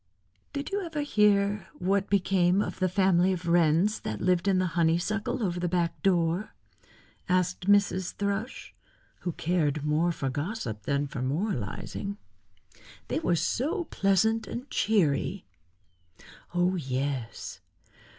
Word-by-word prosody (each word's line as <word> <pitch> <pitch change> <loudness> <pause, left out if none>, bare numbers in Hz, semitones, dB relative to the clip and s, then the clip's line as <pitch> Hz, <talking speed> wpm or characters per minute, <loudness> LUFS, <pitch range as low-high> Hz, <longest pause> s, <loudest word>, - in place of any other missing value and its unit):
"Did 280 +5 -4
you 400 0 -1
ever 320 -4 -3
hear 205 -6 +2
what 195 +2 0
became 190 -1 +3
of 205 - -2
the 185 -1 +2
family 185 -1 +3
of 180 -1 -5
Wrens 170 +4 +3
that 110 - -4
lived 180 +1 +1
in 195 -1 +3
the 185 - +2
honeysuckle 175 +8 0
over 175 -3 -1
the 175 - 0
back 170 -1 -1
door?" 175 +1 +1 0.7
asked 180 0 0
Mrs. 200 -2 +3
Thrush, 200 +4 -3 0.5
who 175 - -3
cared 155 -4 0
more 155 +3 +2
for 135 -5 -3
gossip 145 - -4
than 140 +1 +1
moralizing. 150 - -3 0.9
"They - - 0
were 180 - +1
so 310 - 0
pleasant 220 +3 +2
and 250 +3 -6
cheery." 195 -2 +1 1.1
"Oh, 180 +1 +2
yes. 130 -4 -3
180 Hz, 125 wpm, -28 LUFS, 165-205 Hz, 1.1 s, became